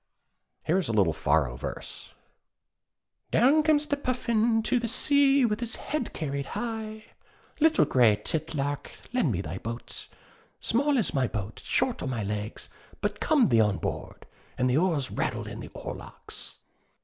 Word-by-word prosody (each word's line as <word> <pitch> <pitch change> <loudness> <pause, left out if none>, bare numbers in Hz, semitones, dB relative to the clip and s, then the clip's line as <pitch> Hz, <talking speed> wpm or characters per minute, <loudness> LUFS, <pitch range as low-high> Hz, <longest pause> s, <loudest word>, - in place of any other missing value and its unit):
Here 180 +4 +2
is 185 - -2
a 115 - -1
little 95 -7 +3
Faroe 75 -6 +1
verse: - - -7 1.1
Down 280 +6 +5
comes 300 -1 +3
the 290 - 0
Puffin 235 -4 +1
to 250 - +2
the 235 - -2
sea, 275 +2 +4
With 210 -2 0
his 235 -2 -3
head 300 -5 -3
carried 140 -3 -3
high. 220 -2 -4 0.5
'Little 320 +1 +5
Gray 120 -5 +5
titlark, 145 +1 -2 0.2
lend 245 - +2
me 95 -3 -1
thy 95 -1 -5
boat?' 115 +2 -7 0.5
'Small 280 +4 +2
is 220 - +1
my 135 -4 +2
boat, 105 -1 -5
short - - 0
are - - -3
my 120 -5 -2
legs 105 +2 -4 0.3
But - - -2
come 295 - +3
thee 115 -3 +5
on 105 -2 +2
board'; - - -5 0.3
And 125 - +2
the 125 - +2
oars 160 -6 +1
rattle - - -2
in - - -7
the - - -8
oarlocks. - - -7
175 Hz, 160 wpm, -28 LUFS, -, 1.1 s, Down